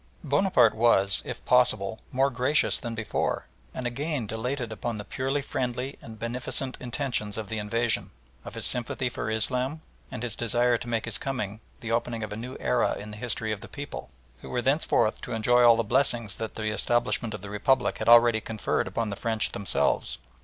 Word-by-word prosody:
Bonaparte 140 - +4
was, 105 -4 +4
if - - -6
possible, - - +3
more 135 +2 +2
gracious 130 +5 +2
than 120 -3 -5
before, 110 -2 -1 0.3
and 130 - -6
again 140 +1 -2
dilated 120 +3 -3
upon 110 +1 -3
the 105 - -6
purely 135 +4 -2
friendly 125 +1 -3
and 110 -1 -10
beneficent 125 +3 -3
intentions 120 -5 -2
of 110 -3 -5
the 110 - -2
invasion, 115 +2 +1 0.3
of - - -9
his - - -1
sympathy 125 +1 -1
for 120 - -4
Islam, 125 +7 0 0.3
and 110 - -5
his 120 -3 -2
desire 120 +1 +2
to 120 - -5
make 115 -2 -1
his 110 -4 +3
coming 110 -6 -3 0.2
the 115 -1 -4
opening 115 -1 -1
of 105 - -5
a - - -4
new 125 +4 -6
era 65 -2 +1
in 105 +1 -8
the 105 - -8
history 110 -1 -2
of 105 -1 -3
the - - -9
people, 145 - -7 0.3
who - - -9
were 125 - -1
thenceforth 135 -5 +2
to - - -5
enjoy 120 +2 +3
all 120 -1 +8
the 115 - +1
blessings 115 -3 +1
that 110 -1 -5
the 110 -1 -2
establishment 115 0 +1
of 105 - -9
the 100 - -7
Republic 120 +5 +1
had 110 +1 0
already 120 -1 +7
conferred 110 -3 -1
upon 105 +3 -2
the - - -3
French 110 +1 +1
themselves. 100 - 0
115 Hz, 195 wpm, -27 LUFS, 110-125 Hz, 0.3 s, all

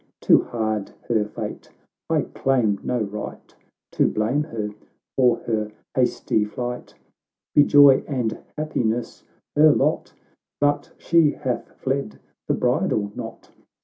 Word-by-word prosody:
Too - - +5
hard 110 -3 -2 0.2
her 110 -3 +3
fate— 105 - -7 0.4
I - - +3
claim 120 -7 +1
no 125 -2 -1
right 105 +1 -7 0.4
To - - +2
blame 125 +8 0
her 110 -8 -4 0.4
for 125 -3 +4
her 110 -2 -1 0.2
hasty 125 -4 +1
flight; 125 +3 -5 0.6
Be 145 - +7
joy 145 -2 +7
and 125 -6 -2 0.2
happiness 120 -6 -2 0.3
her 155 +1 +7
lot! - - 0 0.2
— - - -66
But 145 0 +1
she 165 -3 +3
hath 130 -1 -5
lied 135 -4 -1 0.3
the - - +2
bridal 100 -1 0
knot. - - -8
120 Hz, 125 wpm, -23 LUFS, 110-145 Hz, 0.6 s, Be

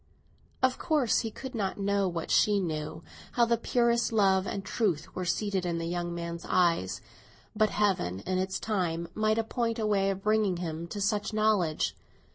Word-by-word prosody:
Of 260 0 +3
course 295 -8 +2
he 225 - -2
could 260 +4 -8
not 200 -5 -2
know 200 0 +1
what 170 -2 -3
she 210 -1 +4
knew, 160 -2 -4 0.3
how 240 - +4
the 235 0 +2
purest 235 0 +1
love 195 -3 +3
and 195 -1 -4
truth 200 -9 -1
were 185 - -3
seated 195 +1 0
in 170 -1 -1
the 165 - -3
young 175 0 -2
man's 170 0 -5
eyes; 170 - +2 0.5
but 215 0 +3
Heaven, 180 - 0
in 185 - -1
its 190 0 -2
time, 170 -6 -1
might 215 0 +1
appoint 230 0 -1
a 220 - -1
way 200 -2 +2
of 195 0 -3
bringing 215 -4 +2
him 165 -1 -4
to 205 - -6
such 210 +2 0
knowledge. 215 -7 +1
195 Hz, 180 wpm, -29 LUFS, 175-215 Hz, 0.5 s, she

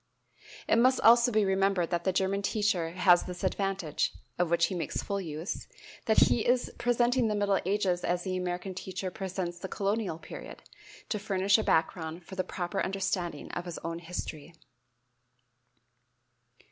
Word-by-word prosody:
It - - +4
must 255 +2 +4
also 235 +2 +6
be 215 -2 +3
remembered 190 -2 +1
that 170 -1 -1
the 190 - +3
German 190 +2 0
teacher 200 -5 0
has 175 0 +5
this 180 0 -7
advantage 190 -5 -1 0.3
of 175 -2 +2
which 170 0 +4
he - - -3
makes 175 - -3
full 200 -1 -2
use 160 +1 -5 0.4
that 220 - +4
he 225 - +1
is 245 0 +1
presenting 245 0 +2
the 210 - 0
middle 200 -1 +2
ages 190 -3 +1
as 175 0 0
the 185 -1 -2
American 180 +1 -3
teacher 185 0 -5
presents 185 -2 -4
the 190 - -5
colonial 200 -3 -1
period, 165 - -10 0.5
to 210 - -1
furnish 200 0 +2
a - - 0
background 160 0 0
for - - -11
the 185 -1 -1
proper 185 +2 -3
understanding 185 -4 -2
of 175 - -4
his 175 -2 -6
own 165 0 -3
history. 165 -2 -6
190 Hz, 160 wpm, -29 LUFS, 175-200 Hz, 0.5 s, also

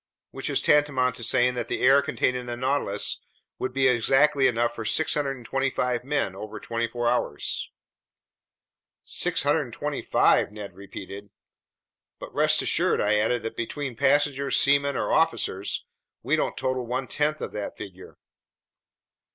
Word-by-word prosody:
Which - - -5
is - - +1
tantamount 145 -4 +3
to 115 - -7
saying 125 +1 +2
that 120 -2 -4
the - - -3
air 135 +2 +6
contained 140 -3 0
in 125 -1 -5
the 120 0 -4
Nautilus 130 -6 -1 0.4
would 130 - -2
be 135 +1 +2
exactly 135 +3 +4
enough 120 -1 0
for 115 - -6
625 135 -3 0
men 140 -8 -1
over 105 +2 -7
twenty 115 +1 -2
four 120 +1 -3
hours." 120 +1 -1 1.3
"625!" - - +1
Ned 105 -1 -8
repeated. 100 +1 -9 0.9
"But - - -10
rest - - +2
assured," - - +1
I 105 +1 +2
added, 115 +3 0
"that 115 - -5
between 130 +2 -4
passengers, 140 +2 +2
seamen, 140 0 +2
or - - -1
officers, 130 -11 0 0.4
we - - +2
don't - - -1
total 130 -2 -2
one 130 +2 -2
tenth 150 +4 -1
of - - -5
that 105 -1 -5
figure." 95 -2 -10
125 Hz, 140 wpm, -25 LUFS, 115-140 Hz, 1.3 s, air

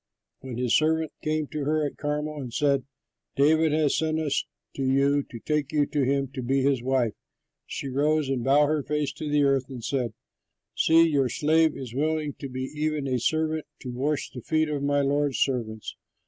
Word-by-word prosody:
When 130 -3 -7
his 125 -1 +2
servants 160 0 +1
came 155 0 0
to 155 - -4
her 155 +1 +1
at 145 - -4
Carmel 150 0 -3
and 125 -3 -6
said, 140 0 +1 0.5
"David 155 +3 +4
has 150 -2 +2
sent 160 0 0
us 150 -3 0 0.3
to - - -4
you 140 +2 +3
to 120 - -8
take 150 +3 -1
you 150 -1 +2
to 145 -1 -1
him 135 +1 +1
to 135 -1 -6
be 135 +2 +1
his 135 -3 +2
wife," 125 -3 +1 0.5
she - - -5
rose 145 +3 +1
and 130 -3 -1
bowed 140 +3 +5
her 150 0 +1
face 150 0 -2
to 150 +1 -5
the 145 0 +3
earth 135 -1 +2
and 125 -4 -8
said, 125 -1 -1 0.6
"See, 165 +1 +5
your 140 -5 +2
slave 155 +4 +2
is 125 -4 -7
willing 155 +1 -1
to 140 - -6
be 130 0 -4
even 150 +1 -2
a 130 -1 0
servant 155 +4 0
to 125 - -5
wash 140 +4 -2
the 125 - -8
feet 155 +4 +1
of 145 -2 -2
my 145 0 +2
lord's 140 0 +1
servants." 115 -5 -2
145 Hz, 200 wpm, -26 LUFS, 130-155 Hz, 0.6 s, bowed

